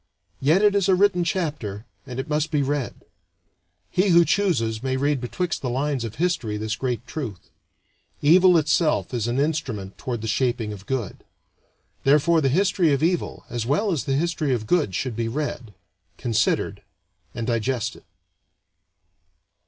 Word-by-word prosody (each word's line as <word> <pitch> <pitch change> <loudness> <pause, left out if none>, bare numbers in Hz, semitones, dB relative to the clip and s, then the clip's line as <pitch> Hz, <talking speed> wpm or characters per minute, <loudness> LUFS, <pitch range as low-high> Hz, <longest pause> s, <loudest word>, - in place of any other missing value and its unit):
Yet 160 +9 +3
it 205 -1 +5
is 200 -1 +2
a 190 - +6
written 185 -2 +3
chapter, 145 - -3 0.2
and 125 0 -6
it 130 - -3
must 150 +1 0
be 145 -2 +1
read. 140 -2 -2 1.0
He 185 +3 +2
who 170 -1 +6
chooses 115 - +1
may 130 0 -1
read 140 -1 0
betwixt 170 +7 -2
the 125 - -2
lines 135 0 -1
of 110 -2 -5
history 145 -11 -1
this 110 +1 -2
great 120 -1 -3
truth: 120 - -7 0.7
Evil 180 +4 +6
itself 155 -2 +1
is 120 -2 -1
an 120 +3 0
instrument 135 -11 -2
toward 120 -4 -4
the 110 - -4
shaping 120 -2 0
of 100 -1 -11
good. 130 -7 -3 0.8
Therefore 150 +4 +4
the 135 - +2
history 180 +1 +2
of 140 +1 +1
evil 175 +1 -1
as 120 -1 -4
well 195 - +1
as 150 -9 -1
the 135 - 0
history 155 -3 0
of 110 -2 -4
good 130 - +1
should 125 0 -2
be 115 0 -1
read, 125 -3 -4 0.5
considered, 115 -4 0 0.5
and 115 - -3
digested. 120 0 -1
135 Hz, 160 wpm, -24 LUFS, 115-165 Hz, 1.0 s, a